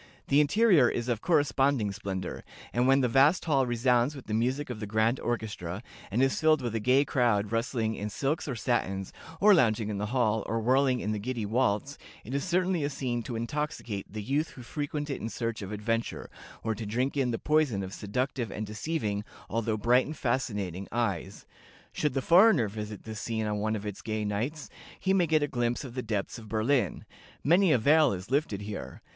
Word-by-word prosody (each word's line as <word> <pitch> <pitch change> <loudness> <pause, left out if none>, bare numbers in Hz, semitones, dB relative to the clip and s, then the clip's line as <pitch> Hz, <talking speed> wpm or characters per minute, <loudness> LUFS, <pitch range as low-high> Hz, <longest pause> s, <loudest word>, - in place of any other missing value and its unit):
The 145 +2 +5
interior 160 - +5
is 120 0 -3
of 115 -2 -1
corresponding 140 - +2
splendor, 95 -2 -5 0.3
and 120 +1 +2
when 135 +1 +5
the 125 - +3
vast 135 +8 +4
hall 135 -5 +2
resounds 120 +3 +2
with 135 - -10
the 105 - -4
music 130 +5 0
of 115 - -6
the 105 - -5
grand 110 +4 +1
orchestra, 105 -4 -4 0.3
and 115 +6 +2
is 135 - +1
filled 155 -1 +4
with 120 -2 -2
a 115 - 0
gay 130 +6 +3
crowd 115 -7 +1
rustling 115 -1 0
in 105 -1 -4
silks 140 +10 -2
or 130 - -2
satins, 95 -4 -1 0.3
or 210 +1 +7
lounging 110 - +3
in 100 -2 -3
the 105 - -2
hall, 110 -2 +1
or 115 - -1
whirling 130 +2 +2
in 105 - -2
the 105 - -2
giddy 115 0 -3
waltz, 115 +4 0 0.2
it 120 - -7
is 140 - 0
certainly 180 -2 +1
a 145 - 0
scene 125 -4 -2
to 115 +1 -6
intoxicate 115 -5 -4
the 105 0 -5
youth 145 +7 0
who 125 - -11
frequent 145 +3 -4
it 135 - -4
in 115 - -3
search 115 -1 -3
of 100 0 -6
adventure, 115 +2 -2 0.3
or 110 - 0
to 110 0 -6
drink 125 +7 -1
in 135 -3 +1
the 115 - -1
poison 150 -10 +1
of 95 0 -7
seductive 125 +2 -2
and 110 +2 -4
deceiving, 105 -2 -2 0.3
although 115 -1 0
bright 120 +4 +3
and 155 0 -6
fascinating 105 -8 -2
eyes. 100 -4 -2 0.5
Should 150 -3 -1
the 135 - 0
foreigner 180 - +6
visit 105 0 -7
this 110 -2 -6
scene 110 -1 -2
on 105 -1 -1
one 110 +1 0
of 105 -1 -5
its 105 -2 -5
gay 110 -1 -2
nights, 120 +9 -3 0.3
he 190 - +1
may 180 -3 +3
get 155 -1 +3
a - - +1
glimpse 120 -1 -1
of 130 -4 -8
the 125 - -3
depths 110 -1 -3
of 110 -2 -12
Berlin 110 - +1
life. - - -13 0.4
Many 175 +4 +4
a 130 - +5
veil 150 +3 +4
is 95 +5 -7
lifted 135 -8 0
here. 105 0 -7
120 Hz, 210 wpm, -29 LUFS, 105-140 Hz, 0.5 s, or